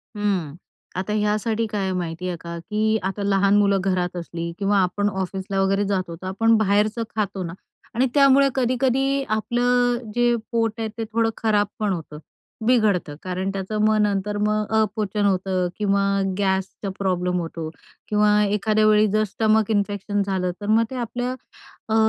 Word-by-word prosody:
हम्म, 190 -8 -1 0.4
आता 200 +3 -2
यासाठी 215 +2 0
काय 210 -1 -3
आहे 190 - -1
माहिती 175 0 -3
आहे 175 -2 -3
का, 170 0 -6
की 215 +4 0
आता 195 +2 -3
लहान 200 0 +3
मुलं 200 -1 +3
घरात 180 -1 -1
असली 170 0 -5
किंवा 200 0 +2
आपण 205 +3 0
ऑफिसला 190 0 -3
वगैरे 195 +1 +1
जातो, 185 -4 -2
तर 185 - -5
आपण 225 +4 +3
बाहेरचं 215 +2 +1
खातो 200 -3 -2
ना. 165 - -5 0.4
आणि 250 +3 +3
त्यामुळे 275 -1 +6
कधी-कधी 265 +2 +1
आपलं 245 +3 +1 0.2
जे 240 0 +3 0.2
पोट 230 -1 +1
आहे 225 - -1
ते 225 - -2
थोडं 225 0 +2
खराब 210 -2 +2
पण 210 -3 +1
होतं. 155 -3 -7 0.5
बिघडतं. 210 -10 +2
कारण 185 +1 -2
त्याचं 195 +2 -3
मग 215 0 +3
नंतर 205 0 0
मग 215 0 0 0.2
अपचन 210 -1 -1
होतं 185 -2 +1
किंवा 200 -1 +1 0.3
गॅसचा 190 0 -1
प्रॉब्लेम 180 -2 0
होतो 165 -1 -5 0.4
किंवा 210 0 +3
एखाद्या 210 +1 +2
वेळी 215 0 +5
जर 215 0 +2
स्टमक 215 +1 +1
इन्फेक्शन 205 0 0
झालं, 185 -2 -1
तर 205 - -5
मग 220 +2 +4
ते - - -5
आपल्या 245 +1 -3 0.6
अ, 220 - +1
205 Hz, 165 wpm, -23 LUFS, 190-220 Hz, 0.6 s, त्यामुळे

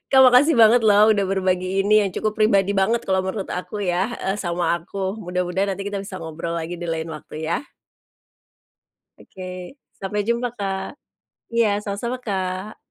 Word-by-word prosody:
Kak, 265 - +7
makasih 260 +4 +7
banget 230 -1 +6
loh, 210 0 +6
udah 205 -2 +3
berbagi 185 0 0
ini, 210 +1 +4
yang 195 - -3
cukup 215 +3 -2
pribadi 200 -2 +3
banget 225 +5 +2
kalau 190 0 +2
menurut 190 +1 -4
aku 185 +3 -5
ya 180 -1 +1
heeh, 195 -3 -2
sama 175 -3 0
aku. 190 +3 -4
Mudah-mudahan 180 0 -1
nanti 190 - -6
kita 205 - -4
bisa 195 -1 -6
ngobrol 165 +1 -5
lagi, 170 +1 -4
di 175 - -7
lain 165 -1 -3
waktu 155 0 -7
ya. 225 - -1 1.5
Oke, 185 +6 -9 0.2
sampai 200 +2 -2
jumpa 235 +1 0
Kak. 195 +5 -4 0.6
Iya, 230 -1 +3 0.2
sama-sama 220 +5 -3
Kak. 190 0 -3
195 Hz, 165 wpm, -22 LUFS, 180-215 Hz, 1.5 s, Kak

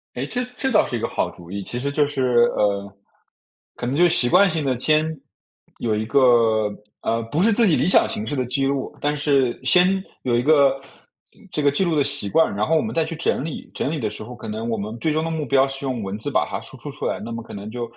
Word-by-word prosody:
哎， 125 - -3
这 245 - -3
这 265 - -1
倒 210 - +4
是 120 - -3
一 - - -5
个 115 - -2
好 - - -1
主 85 0 -14
意。 100 +1 -4
其 120 - -6
实 140 +3 -2
就 145 0 +2
是 125 -4 +2
呃， 100 -1 0 0.8
可 - - -5
能 125 +3 -1
就 175 +3 +5
习 130 -7 +4
惯 200 +10 +5
性 160 -3 -1
地 130 -2 0
先 155 +4 +2 0.7
有 110 -2 0
一 105 - -1
个， 115 -5 +4 0.4
呃， 115 0 0
不 160 - +1
是 225 +2 +4
自 230 +1 +4
己 165 - +4
理 - - +1
想 185 - +5
形 220 -1 -2
式 145 - -3
的 130 - 0
记 135 +3 -1
录， 135 -1 -2
但 145 +1 0
是 140 -4 +1
先 185 +2 +4 0.2
有 120 -2 +1
一 120 - +2
个 140 -1 +3 0.7
这 150 - -1
个 145 -1 +3
记 145 +7 +1
录 170 -2 0
的 145 - +3
习 140 -7 -2
惯， 160 -1 +2
然 105 +1 0
后 165 - +1
我 - - +3
们 220 - -4
再 165 -1 +1
去 165 +1 -5
整 155 -3 -1
理， 160 - -7
整 140 - -1
理 160 - -3
的 110 -5 -1
时 110 - -8
候 125 +3 -9
可 120 - -9
能 110 +2 -4
我 115 -1 -1
们 105 +3 -5
最 155 +5 0
终 155 +1 0
的 165 - -2
目 160 -2 -3
标 135 +1 +3
是 135 +1 -6
用 130 -4 -2
文 100 0 -4
字 110 - -5
把 - - +2
它 - - -3
输 - - -11
出 - - -8
出 - - -6
来， - - -1
那 115 - -6
么 115 0 -5
可 - - -12
能 100 +1 -7
就， 120 +2 -5
135 Hz, 295 characters per minute, -22 LUFS, 115-155 Hz, 0.8 s, 就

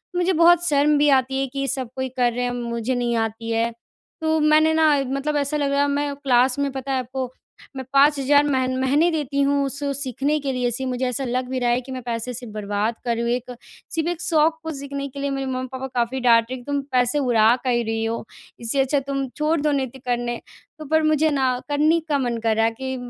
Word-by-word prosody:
मुझे 360 +1 +2
बहुत 345 +1 +5
शर्म 295 0 +3
भी 295 0 +4
आती 265 +1 -3
है 270 - 0
कि 275 0 -2
सब 265 -3 -2
कोई 260 0 -3
कर 245 -1 +3
रहे 245 +1 -2
हैं 245 - -1
मुझे 235 0 -3
नहीं 240 -1 0
आती 225 +1 -7
है। 230 +1 +1 0.5
तो 315 0 +1
मैंने 310 +1 +4
न - - +3 0.3
मतलब 285 +2 -1
ऐसा 285 +1 0
लग 285 -1 0
रहा 280 0 +2
है 285 - +2
मैं 285 0 -1
क्लास 260 -2 +2
में 280 -1 0
पता 270 0 -5
है 265 - +1
आपको 255 0 -4 0.4
मैं 265 - -4
5 285 +1 +5
हज़ार 285 +2 +4
मह 260 -2 +1
महीने 285 +6 +3
देती 285 -3 -1
हूँ 280 0 +2
उस 275 +1 -4
उस 280 0 -2
सीखने 275 +4 -1
के 275 -2 -2
लिए 250 -1 0
सी 265 +3 -3
मुझे 255 0 -2
ऐसा 250 +2 -2
लग 250 +1 -2
भी 260 0 -2
रहा 245 -1 +1
है 240 +1 +1
कि 260 +1 -11
मैं 260 -1 -5
पैसे 235 +1 -3
सिर्फ़ 240 -2 -8
बर्बाद 210 +2 -2
कर 235 -1 +1
रही - - -1
हूँ। 235 - -1
एक 250 0 -7 0.4
सिर्फ़ 325 0 -1
एक 350 -1 -4
शौक 320 -1 +2
को 320 - -4
सीखने 280 0 -5
के 280 - -9
लिए 280 0 -1
मेरे 270 -1 -3
मम्मी-पापा 260 0 -4
काफ़ी 240 +2 0
डाँट 235 -2 +5
रहे 260 - -3
हैं - - -7
कि 285 - -5
तुम 285 0 0
पैसे 250 +2 +2
उड़ा 235 -4 +4
काहे 245 -2 +1
रही 225 0 -2
हो। 225 +1 -3 0.3
इससे 235 +4 -1
अच्छा 270 +2 +1
तुम 275 -1 -2
छोड़ 305 +2 +1
दो 300 0 +1
नृत्य 265 -2 -2
करने। 240 -1 -1 0.4
तो 310 - -7
पर 315 +2 +2
मुझे 310 0 +3
न 260 -3 +1
करनी 305 +3 +3
का 290 - +2
मन 240 -3 -1
कर 225 -1 +2
रहा 225 +1 +3
है 225 - +2
कि 260 0 -3
265 Hz, 250 wpm, -22 LUFS, 245-285 Hz, 0.5 s, बहुत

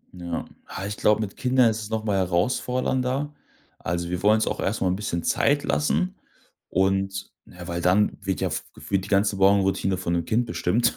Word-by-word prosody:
Ja. 85 -2 -4 0.2
Ah, 95 - -6
ich 105 0 -4
glaub, 105 0 +3
mit 105 -3 -4
Kindern 125 -2 +3
ist 110 - -4
es 105 - -7
noch 110 -1 -2
mal 100 -3 0
herausfordernder. 125 +9 0 0.5
Also, 85 0 -2
wir 90 0 -2
wollen 105 +1 +5
uns 110 - +1
auch - - -2
erst 105 +3 -1
mal 95 - +2
'n 90 - +1
bisschen 95 -4 -3
Zeit - - +2
lassen 75 +4 0 0.5
und 95 +1 0
ja, 90 0 -11
weil 85 0 -3
dann 95 +4 +3
wird 95 -2 -2
ja - - 0
f - - -3
gefühlt 95 +5 -2
die - - -10
ganze 100 0 +2
Morgenroutine 95 -1 +3
von 85 -2 -2
'nem 85 -1 0
Kind 120 +5 +1
bestimmt. 90 +5 +1
95 Hz, 200 wpm, -25 LUFS, 90-110 Hz, 0.5 s, wollen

